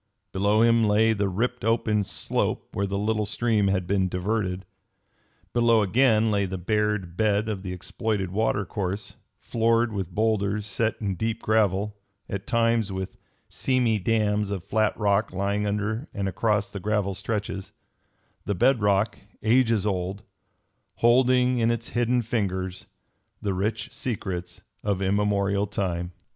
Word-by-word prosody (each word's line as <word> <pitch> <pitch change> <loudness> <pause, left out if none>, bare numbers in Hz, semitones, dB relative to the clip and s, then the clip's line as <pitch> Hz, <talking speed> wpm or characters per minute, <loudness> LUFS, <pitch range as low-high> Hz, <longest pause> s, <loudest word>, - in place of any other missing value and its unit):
Below 100 +3 +3
him 115 0 +4
lay 110 +2 +4
the 100 -2 0
ripped 125 +6 -2
open 110 -2 +2
slope - - -2
where 100 - -1
the 100 0 -2
little 105 0 0
stream 110 -1 +1
had 95 -2 +1
been 95 0 +1
diverted. 95 0 -2 0.9
Below 115 -2 +4
again 110 +1 +3
lay 100 -1 +1
the 95 0 -4
bared 105 -2 -1
bed 105 +1 +1
of 105 -3 -3
the 95 -1 -5
exploited 95 +1 -2
water 100 0 0
course, 100 +1 -4 0.2
floored 115 0 +1
with 95 -4 -3
bowlders 105 -1 +1
set 110 +2 0
in 100 -3 -1
deep 110 +4 -3
gravel, 105 -1 +1 0.3
at 100 0 -5
times 115 -4 +2
with 95 0 -5 0.3
seamy 125 -4 +1
dams 105 0 +1
of 100 -4 -3
flat 110 +2 +1
rock 105 0 +1
lying 100 +2 0
under 105 +6 -2
and 100 -1 -1
across 105 +2 0
the 100 - -5
gravel 105 0 0
stretches; 100 0 -4 0.7
the 100 - -1
bed 125 +5 +3
rock, 100 +1 +2 0.2
ages 115 -2 +3
old, 95 0 -2 0.7
holding 125 +1 +4
in 115 0 +3
its 115 0 -2
hidden 120 0 +1
fingers 95 -5 -2 0.5
the 100 - -1
rich 105 +4 -2
secrets 90 -7 -4 0.2
of 100 -3 0
immemorial 100 0 +1
time. 90 -4 -2
105 Hz, 145 wpm, -26 LUFS, 95-115 Hz, 0.9 s, him